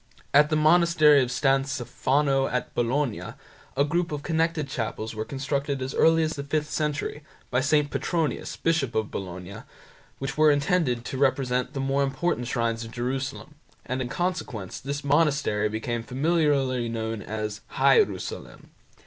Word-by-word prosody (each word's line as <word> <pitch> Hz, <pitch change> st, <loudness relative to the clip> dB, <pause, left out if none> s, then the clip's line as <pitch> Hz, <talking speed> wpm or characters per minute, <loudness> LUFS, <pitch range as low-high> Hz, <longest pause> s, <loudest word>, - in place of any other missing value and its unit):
At 150 Hz, +1 st, +6 dB
the 155 Hz, -, +1 dB
monastery 155 Hz, -2 st, +5 dB
of 125 Hz, -1 st, -1 dB
San 135 Hz, +1 st, +2 dB
Stefano 135 Hz, +1 st, 0 dB
at 125 Hz, -, -3 dB
Bologna 120 Hz, 0 st, -1 dB, 0.4 s
a 140 Hz, -, +5 dB
group 170 Hz, +3 st, -1 dB
of 145 Hz, -1 st, -4 dB
connected 165 Hz, -2 st, 0 dB
chapels 115 Hz, -3 st, -4 dB
were 110 Hz, 0 st, -3 dB
constructed 140 Hz, +1 st, -2 dB
as 130 Hz, +1 st, -4 dB
early 165 Hz, 0 st, +4 dB
as 155 Hz, -, 0 dB
the 140 Hz, -, -5 dB
fifth 150 Hz, +1 st, -2 dB
century, 150 Hz, -1 st, -2 dB, 0.3 s
by 125 Hz, +1 st, +2 dB
St. 145 Hz, +1 st, +2 dB
Petronius, 165 Hz, -7 st, -2 dB
Bishop 160 Hz, -7 st, 0 dB
of 110 Hz, -1 st, -1 dB
Bologna, 90 Hz, 0 st, -6 dB, 0.6 s
which 135 Hz, +2 st, -4 dB
were 155 Hz, 0 st, +7 dB
intended 145 Hz, -4 st, +1 dB
to 130 Hz, -, -4 dB
represent 130 Hz, -2 st, +1 dB
the 135 Hz, -, -4 dB
more 135 Hz, +1 st, +1 dB
important 135 Hz, -1 st, -1 dB
shrines 115 Hz, -2 st, -1 dB
of 115 Hz, -, -8 dB
Jerusalem, 130 Hz, +5 st, -4 dB, 0.3 s
and 130 Hz, +1 st, -2 dB
in 120 Hz, -, -3 dB
consequence, 150 Hz, -, -3 dB
this 140 Hz, +1 st, -4 dB
monastery 140 Hz, -8 st, +2 dB
became 115 Hz, +2 st, -3 dB
familiarly 135 Hz, -2 st, +1 dB
known 110 Hz, -1 st, -3 dB
as 110 Hz, +1 st, -4 dB
"Hierusalem". 435 Hz, -3 st, +1 dB
135 Hz, 150 wpm, -26 LUFS, 120-150 Hz, 0.6 s, were